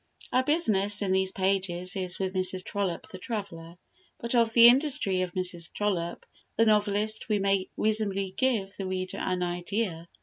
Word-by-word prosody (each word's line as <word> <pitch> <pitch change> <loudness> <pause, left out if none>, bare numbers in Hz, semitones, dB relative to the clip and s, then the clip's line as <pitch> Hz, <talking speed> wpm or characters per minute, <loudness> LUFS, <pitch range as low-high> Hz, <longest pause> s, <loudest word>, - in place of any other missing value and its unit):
Our 255 - +4
business 210 - +3
in 190 - -1
these 190 0 +2
pages 185 -2 -1
is 185 -2 -1
with 190 -1 -3
Mrs. 185 0 +1
Trollope 190 -4 -3
the 185 - -9
traveller, 180 -6 -7 0.4
but 235 +1 -5
of 230 -2 +3
the 235 0 +7
industry 245 -8 +2
of 180 -1 -3
Mrs. 180 -2 -1
Trollope 180 -5 -3 0.3
the 225 - +4
novelist 215 0 +1
we 210 - +2
may 195 -1 0
reasonably 200 -3 0
give 205 -4 -1
the 195 - -4
reader 185 0 -4
an 185 -1 -2
idea. 175 0 -3
195 Hz, 165 wpm, -27 LUFS, 185-215 Hz, 0.4 s, the